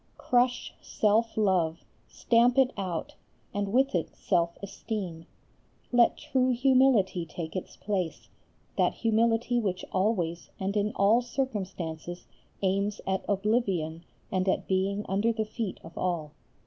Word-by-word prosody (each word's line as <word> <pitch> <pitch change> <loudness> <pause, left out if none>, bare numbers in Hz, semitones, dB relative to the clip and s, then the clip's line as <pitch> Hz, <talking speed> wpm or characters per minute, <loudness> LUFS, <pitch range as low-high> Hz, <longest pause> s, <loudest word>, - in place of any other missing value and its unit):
Crush 245 0 +1
self 220 +2 +1
love, 180 -6 +1 0.2
stamp 240 +2 +3
it 265 -1 +4
out; 185 -5 -3 0.4
and 205 -1 -2
with 265 +4 +3
it 170 -3 -2
self 170 -2 0
esteem. 195 -4 -5 0.6
Let 240 -1 +4
true 260 -1 +1
humility 250 -7 +3
take 165 +1 -7
its 185 - -5
place, 190 -5 -3 0.5
that - - +3
humility 230 +1 +2
which 190 -5 -2
always 185 -4 0
and 195 +2 -2
in 210 0 +1
all 210 +5 +4
circumstances 185 - -4 0.4
aims 200 +2 0
at 190 0 -1
oblivion 195 -6 0 0.3
and 185 0 +1
at - - 0
being 195 +2 0
under 205 +4 +2
the 220 -1 -1
feet 215 -2 -4
of 165 - -12
all. 170 -5 -2
200 Hz, 130 wpm, -28 LUFS, 180-230 Hz, 0.6 s, it